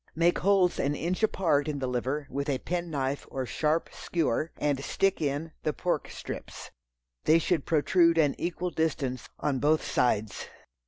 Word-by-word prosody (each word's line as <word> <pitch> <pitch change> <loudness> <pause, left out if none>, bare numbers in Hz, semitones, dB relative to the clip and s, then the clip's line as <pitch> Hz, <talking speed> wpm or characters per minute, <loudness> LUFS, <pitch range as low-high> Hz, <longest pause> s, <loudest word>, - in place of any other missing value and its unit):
Make 170 +2 +3
holes 190 -2 +3
an 145 +1 +1
inch 175 +7 -2
apart 165 -9 +2
in 150 -2 -2
the 135 - -2
liver 130 +4 -2
with 140 +2 -2
a 135 - +1
pen 175 +4 -3
knife 140 -2 -2
or 130 -1 -3
sharp 155 +5 0
skewer, 160 -2 -1
and 140 -2 0
stick 195 +2 +1
in 150 +2 -1
the 155 - -1
pork 175 - -1
strips. - - -7 0.5
They 155 - +6
should 165 -2 0
protrude 165 +2 +4
an 150 -3 +4
equal 175 +1 -2
distance 135 -7 -1
on 140 -3 0
both 155 +3 +3
sides. 110 -4 0
150 Hz, 165 wpm, -28 LUFS, 140-170 Hz, 0.5 s, They